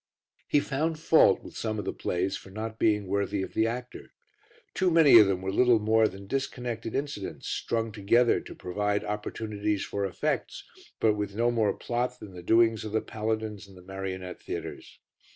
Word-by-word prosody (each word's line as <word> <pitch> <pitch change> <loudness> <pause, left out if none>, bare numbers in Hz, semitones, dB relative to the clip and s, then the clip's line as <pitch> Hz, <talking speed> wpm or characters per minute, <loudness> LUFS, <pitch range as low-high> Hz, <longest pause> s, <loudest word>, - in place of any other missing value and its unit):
He 145 - +4
found 155 +3 -1
fault 160 0 +4
with - - -11
some 110 -1 -2
of 105 - -4
the - - -2
plays 95 +2 -1
for - - -10
not 110 +3 -6
being 105 -2 +2
worthy 100 0 -1
of - - -7
the 110 - +2
actor. 125 +2 -6 0.6
Too 185 - +2
many 160 -8 +8
of 105 - +7
them 95 -1 -1
were 95 - -1
little 120 +2 +4
more 110 +1 +3
than 95 0 -9
disconnected 120 -2 -3
incidents, 140 -8 -4
strung 115 -1 -2
together 110 +4 +3
to - - -11
provide 105 +3 -1
opportunities 105 0 -3
for 100 - -3
effects, 95 -4 -2 0.4
but 110 -1 +4
with 105 -1 -4
no 120 +2 +2
more 110 -3 +2
plot 125 +1 -3
than 100 -3 -10
the 90 - -9
doings 115 +3 +3
of 110 -1 -6
the 110 - +2
paladins 110 -2 -3
in 95 - -16
the 90 - -14
marionette 95 -1 -6
theatres. - - -7
110 Hz, 185 wpm, -28 LUFS, 100-115 Hz, 0.6 s, many